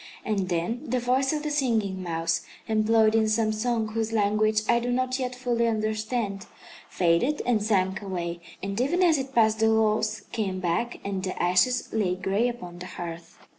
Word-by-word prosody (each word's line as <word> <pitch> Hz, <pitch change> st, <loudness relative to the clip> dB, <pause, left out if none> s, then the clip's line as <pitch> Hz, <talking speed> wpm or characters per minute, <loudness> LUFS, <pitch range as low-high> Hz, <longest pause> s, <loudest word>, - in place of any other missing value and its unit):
And 200 Hz, -4 st, -1 dB
then 175 Hz, +8 st, -1 dB
the 255 Hz, +1 st, +1 dB
voice 255 Hz, +2 st, +1 dB
of 300 Hz, -1 st, -2 dB
the 300 Hz, -, -2 dB
Singing 225 Hz, -9 st, 0 dB
Mouse, 165 Hz, -1 st, -1 dB, 0.3 s
employed 220 Hz, 0 st, +3 dB
in 220 Hz, -1 st, +3 dB
some 215 Hz, 0 st, +2 dB
song 220 Hz, 0 st, -1 dB
whose 225 Hz, 0 st, -2 dB
language 215 Hz, 0 st, +2 dB
I 235 Hz, -, +4 dB
do 245 Hz, +1 st, -2 dB
not 255 Hz, +1 st, 0 dB
yet 250 Hz, -1 st, -3 dB
fully 240 Hz, -2 st, 0 dB
understand, 215 Hz, -1 st, -2 dB, 0.4 s
faded 180 Hz, -, +1 dB
and 240 Hz, -4 st, +2 dB
sank 190 Hz, -3 st, +1 dB
away; 175 Hz, -3 st, -4 dB, 0.2 s
and 200 Hz, +3 st, -2 dB
even 345 Hz, +8 st, +2 dB
as 325 Hz, -5 st, +4 dB
it 270 Hz, 0 st, -6 dB
passed 220 Hz, -1 st, +4 dB
the 225 Hz, 0 st, +4 dB
walls 220 Hz, -1 st, +1 dB
came 195 Hz, -4 st, -2 dB
back 180 Hz, +7 st, -1 dB
and 195 Hz, -1 st, -2 dB
the 185 Hz, 0 st, -4 dB
ashes 185 Hz, +8 st, +2 dB
lay 200 Hz, -5 st, +1 dB
gray 195 Hz, +5 st, 0 dB
upon 180 Hz, -7 st, -8 dB
the 180 Hz, -, -7 dB
hearth. 170 Hz, -2 st, -8 dB
215 Hz, 180 wpm, -26 LUFS, 190-240 Hz, 0.4 s, I